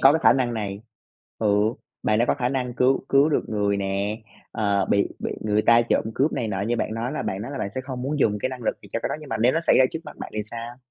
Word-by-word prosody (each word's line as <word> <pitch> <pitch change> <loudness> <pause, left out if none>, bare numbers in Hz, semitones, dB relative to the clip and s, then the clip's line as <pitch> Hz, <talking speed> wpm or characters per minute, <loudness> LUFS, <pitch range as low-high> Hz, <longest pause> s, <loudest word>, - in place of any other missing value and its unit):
có 135 - +7
cái 160 - +2
khả - - +7
năng 125 -3 0
này 100 -2 -4 0.6
ừ, 110 - 0 0.6
bạn 105 - +2
đã 120 - +4
có - - +2
khả 125 - 0
năng 125 -2 -2
cứu 130 +2 +2
cứu 140 +3 +5
được 150 - 0
người 100 -1 +1
nè, 100 +2 -1 0.3
ờ 100 -3 +1
bị 100 - +3
bị - - -3
người 105 0 +1
ta 115 +1 +6
trộm 115 - +1
cướp 145 +4 +2
này 115 - -2
nọ 95 -2 -2
như 120 +4 0
bạn 110 - -2
nói 115 +3 -3
là 155 - -2
bạn 95 +2 -3
nói 120 - -6
là 140 - -5
bạn 100 - -2
sẽ 130 - -2
không 130 -1 -6
muốn 145 +3 -2
dùng 105 -6 +2
cái 130 - 0
năng 130 -1 -7
lực 110 - -1
gì - - -13
cho 115 - -1
cái - - 0
đó, - - -2
nhưng 150 - -11
mà - - -1
nếu 120 +4 +3
nó 165 - +1
xảy 170 - +4
ra 130 - +7
trước 160 - -4
mắt - - -10
bạn - - -7
thì 105 - -1
sao? 120 +1 -6
115 Hz, 305 wpm, -24 LUFS, 105-130 Hz, 0.6 s, có